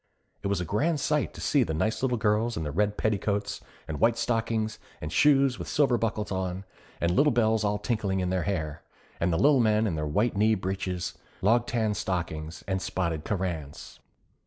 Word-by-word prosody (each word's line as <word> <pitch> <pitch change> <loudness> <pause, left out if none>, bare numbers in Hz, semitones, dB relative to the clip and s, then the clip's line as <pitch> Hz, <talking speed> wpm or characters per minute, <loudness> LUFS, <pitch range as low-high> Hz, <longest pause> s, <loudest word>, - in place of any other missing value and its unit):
It - - -2
was 100 -1 0
a 90 - -2
grand 145 - +1
sight 150 +1 0
to - - -8
see 145 - +3
the 80 -10 0
nice 110 +8 0
little 125 -2 +1
girls 110 +2 +1
in 80 - -2
their 75 - -3
red 105 +6 0
petticoats, 105 -1 -1 0.3
and 80 -2 -4
white 115 0 +3
stockings 115 -2 -1 0.2
and 75 +1 -5
shoes 135 - +4
with - - -5
silver 140 -4 +3
buckles 110 -3 -2
on, 95 0 -3 0.3
and 85 - +1
little 145 +11 +4
bells 110 -2 +2
all 105 0 +1
tinkling 105 -3 -1
in 90 -1 -1
their 95 -1 +1
hair; 80 -6 -3 0.4
and 85 +1 +1
the 80 - +1
Lil 140 - +5
Men 110 -1 +3
in 100 - 0
their 75 -1 -2
white 105 +11 +1
knee 110 +2 +3
breeches, 95 -2 -3 0.3
loghtan 115 0 +2
stockings 85 -4 -3
and 95 -1 -1
spotted 85 -6 -2
carranes. 85 -8 -4
105 Hz, 190 wpm, -27 LUFS, 90-115 Hz, 0.4 s, Lil